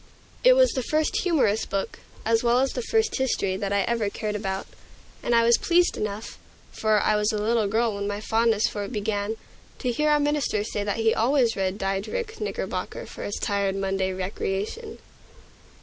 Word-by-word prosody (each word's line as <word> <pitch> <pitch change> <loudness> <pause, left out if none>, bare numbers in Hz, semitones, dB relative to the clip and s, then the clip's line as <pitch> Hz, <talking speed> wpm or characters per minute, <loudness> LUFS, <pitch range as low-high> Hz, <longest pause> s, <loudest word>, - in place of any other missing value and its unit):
It - - +8
was - - +5
the 260 - -1
first 310 +5 0
humorous 275 - +2
book, 195 0 -3 0.3
as 225 0 +3
well 240 0 +3
as 270 0 +1
the 250 - -2
first 445 - +1
history, 220 -8 0
that 200 0 -3
I 200 0 +2
ever 230 -2 0
cared 210 +1 -4
about. 195 -2 -3 0.6
And 240 - +1
I 230 - +5
was 235 0 +5
pleased 350 +1 +3
enough 210 +1 -5 0.3
for 215 -1 +2
I 215 - +2
was 210 +1 +2
a 215 - -1
little 220 0 +1
girl 225 +2 +1
when 200 0 -3
my 205 0 -3
fondness 225 0 +2
for 205 - -4
it 200 - -6
began 210 -1 -2 0.4
to 250 - -1
hear 300 +6 +1
our 300 0 +4
minister 290 -8 0
say 210 -1 -3
that 205 +1 -2
he 225 0 +3
always 240 0 +2
read 190 0 -1
Diedrich 335 - -3
Knickerbocker 425 - -4
for - - -10
his 205 - -3
tired 200 -1 0
Monday's 190 -1 -1
recreation. 200 - -3
220 Hz, 190 wpm, -25 LUFS, 200-260 Hz, 0.6 s, It